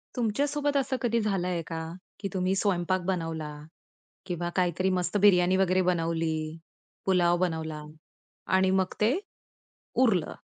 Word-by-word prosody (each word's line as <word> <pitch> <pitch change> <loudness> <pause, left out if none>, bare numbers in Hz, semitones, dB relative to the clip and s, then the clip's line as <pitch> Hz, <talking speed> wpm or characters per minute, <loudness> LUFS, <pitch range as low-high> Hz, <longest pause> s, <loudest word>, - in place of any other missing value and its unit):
तुमच्या 240 +3 +1
सोबत 290 0 0
असं 270 0 0
कधी 235 -1 +1
झालंय 180 -4 -1
का? 165 - -4 0.4
की 200 - -3
तुम्ही 185 0 +1
स्वयंपाक 185 -2 +1
बनवला 165 -4 -2 0.7
किंवा 175 -2 -3
काहीतरी 185 +1 +1
मस्त 180 +2 0
बिर्याणी 185 -2 +5
वगैरे 185 -1 +3
बनवली, 165 -2 -1 0.5
पुलाव 175 -2 +3
बनवला 160 -4 -2 0.7
आणि 190 0 +3
मग 190 -1 +1
ते 215 +3 +4 0.9
उरलं 190 -10 +2
185 Hz, 125 wpm, -28 LUFS, 170-195 Hz, 0.9 s, बिर्याणी